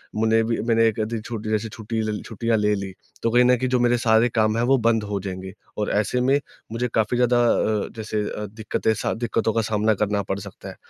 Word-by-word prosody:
मुझे 110 +1 +3
भी 115 0 -1
मैंने 115 -1 +4
1 110 0 -1
आध 110 - 0
दिन 115 -2 -3
छुट्टी 110 -1 -5
जैसे 110 +1 -1 0.4
ल 105 - -3
छुट्टियाँ 115 +1 -1
ले 105 0 +2
ली, 95 -1 -5 0.3
तो 115 - +2
कहीं 125 +1 +5
न 125 0 +5
कहीं 130 +2 -1
जो 125 -1 +2
मेरे 120 0 +3
सारे 115 +1 +3
काम 110 -1 +1
है 115 - +1
वो 135 +2 +4
बंद 115 -2 +2
हो 105 -1 -3
जाएँगे। 95 0 -6 0.2
और 105 - -1
ऐसे 105 +4 +1
में 135 +3 +3 0.3
मुझे 120 +2 -1
काफ़ी 110 +2 +1
ज़्यादा 125 0 +3
अ, 110 -2 +1
जैसे 110 -1 -3 0.2
अ, 105 - -4
दिक्कतें 110 +1 -1
सा - - -2
दिक्कतों 115 -1 -1
का 115 - +1
सामना 110 0 +1
करना 105 0 0
पड़ 95 +1 -3
सकता 100 -1 -10
है। - - -10
110 Hz, 235 wpm, -23 LUFS, 105-115 Hz, 0.4 s, कहीं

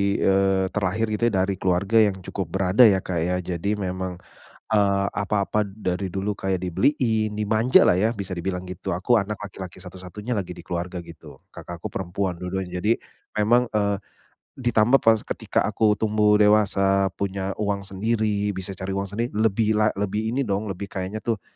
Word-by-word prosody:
eee, 95 -1 +2
terlahir 105 +2 -1
gitu 110 +2 +1
ya 95 -5 +2
dari 95 -1 -2
keluarga 95 +4 +2
yang 105 -3 +4
cukup 95 -2 -4
berada 95 +5 +6
ya 95 -2 +2
Kak 90 -3 -2
ya. 90 +3 0
Jadi 90 +4 -2
memang, 95 -2 -3 0.6
eee, 100 -1 +3
apa-apa 100 +1 0
dari 95 -2 -3
dulu 100 +2 -2
kayak 95 -2 -1
dibeliin, 110 - +1
dimanjalah 110 -1 +4
ya 110 +5 +2
bisa 100 -5 -5
dibilang 90 +1 -4
gitu. 95 +1 -5
Aku 95 +8 +2
anak 105 0 -1
laki-laki 95 -3 -8
satu-satunya 95 +6 -6
lagi 95 -4 -3
di 85 -1 -11
keluarga 90 +1 -3
gitu, 85 -1 -12 0.2
kakakku 85 0 -7
perempuan 95 0 -3
dua-duanya, 90 0 -4
jadi 110 +2 +2 0.4
memang, 120 +3 +3
eee, 100 -2 +1 0.6
ditambah 120 +1 +3
pas 110 -1 +5
ketika - - -2
aku 105 -1 +2
tumbuh 105 -1 +3
dewasa 100 -2 +3
punya 100 -1 -2
uang 100 -1 -1
sendiri, 105 0 -1
bisa 95 +1 -4
cari 95 +1 -5
uang 100 - -1
sendi 115 +4 -1
lebih 110 0 +2
la 105 0 +3
lebih 105 +2 -1
ini 130 +2 -1
dong, 100 +1 -1
lebih 95 +2 -5
kayaknya 95 +2 -4
tuh, 110 -2 -2
100 Hz, 165 wpm, -24 LUFS, 95-105 Hz, 0.6 s, berada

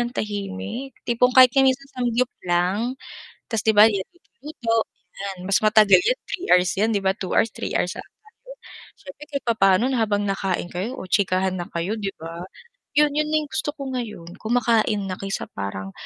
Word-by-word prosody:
ng 240 0 -1
tahimik, 205 - -4
tipong 245 +1 +2
kahit 255 -2 +8
minsan 270 +1 +2
samgyup 245 0 0
lang, 185 +8 0 0.5
ta's 225 -3 -1
'di 220 - +4
ba 210 +1 +9
yan 195 -3 -2
luto-luto, 300 - -5 0.4
yan 195 -1 -6
mas 195 - +3
matagal 215 -2 +6
'yan - - 0
3 365 - -4
hours 180 0 +4
'yan, 215 +3 +2
'di 200 - 0
ba, 190 - +3
2 190 - -4
hours, 225 - +3
3 - - -5
hours 180 - -1
ata - - -9 0.4
yun. - - -10 0.4
Siyempre 280 +1 -11
kahit 280 -2 -4
papaano 195 -2 +3
na 250 -3 0
habang 205 -1 0
nakain 195 -2 -2
kayo 205 +9 -4
o - - -7
chikahan 185 0 +1
na 175 0 -6
kayo, 170 +5 -2
'di 195 -2 -3
ba, 165 +2 -7 0.5
yun, 300 0 +5
yun 300 +1 0
na 310 - +2
yung 295 - -11
gusto 295 - -2
ko 275 -3 -6
ngayon 210 -9 -5
kumakain 225 -2 +1
na 185 - -3
kaysa 195 0 -4
parang 95 -1 -5
215 Hz, 190 wpm, -23 LUFS, 190-255 Hz, 0.5 s, ba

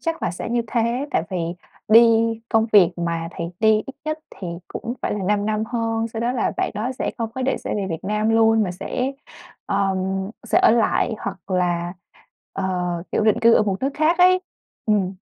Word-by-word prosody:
chắc 330 -1 -3
là 180 - 0
sẽ 180 - -6
như 235 0 +1
thế. 235 +4 0
Tại - - +1
vì 185 - -2 0.5
đi 220 +2 +9 0.5
công 225 -1 +3
việc 185 -5 +7
mà 170 -1 -2
thầy 170 - -5
đi 220 0 +5 0.2
ít 270 - -8
nhất 310 0 -2
thì 185 - -7 0.2
cũng 240 +1 -5
phải - - -1
là 210 - -3
5 205 +1 +1
năm 215 0 0
hơn. 225 -1 -1
Sau 225 0 -5
đó 240 +1 0
là 250 - 0
bạn - - 0
đó 220 +5 -2
sẽ - - -1
không 225 -1 -2
có 260 - -3
định 265 - 0
sẽ - - -4
về 200 -2 -2
Việt 165 - -5
Nam 210 +2 0
luôn 225 -1 +4
mà 185 - -1
sẽ, 250 +9 -3 0.5
ờ, 195 -1 +1 0.5
sẽ 220 -2 +3
ở - - +5
lại 225 0 +2
hoặc 195 -2 -7
là, 175 -1 0 0.6
ờ, 195 - -3 0.5
kiểu, 215 - +1
định 215 - +3
cư 230 0 +6
ở - - +5
một 195 -2 -1
nước 270 - +1
khác 315 +4 +2
ấy. 370 +1 +6 0.5
Ừm. 200 -3 +1
220 Hz, 210 wpm, -22 LUFS, 195-235 Hz, 0.6 s, đi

